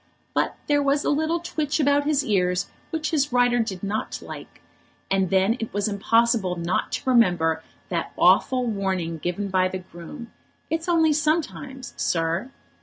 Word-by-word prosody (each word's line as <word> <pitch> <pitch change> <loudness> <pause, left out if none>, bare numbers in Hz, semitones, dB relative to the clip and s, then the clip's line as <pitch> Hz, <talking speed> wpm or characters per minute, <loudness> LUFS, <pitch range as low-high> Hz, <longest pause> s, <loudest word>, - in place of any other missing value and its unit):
But - - 0
there 290 -1 +2
was 280 +1 +1
a - - +2
little 315 +3 +1
twitch 310 -3 -2
about 285 0 +3
his 295 -2 +2
ears 180 -3 +1 0.2
which 315 -1 -2
his 290 -3 +1
rider 245 0 +3
did 205 -5 -3
not 205 +2 -3
like, - - -10 0.5
and 190 -2 +2
then 195 +5 +2
it 225 - -4
was 205 0 +1
impossible 220 -1 +2
not 170 +1 -1
to - - -4
remember 175 -9 +3 0.3
that - - -2
awful 255 -1 +4
warning 190 -6 -2
given 180 +5 -3
by 185 -1 +2
the 185 - -4
groom, 185 - -10 0.4
"It's 325 +2 -1
only 325 -3 +4
sometimes, 295 -4 -2
sir." 165 +7 0
230 Hz, 160 wpm, -24 LUFS, 185-290 Hz, 0.5 s, awful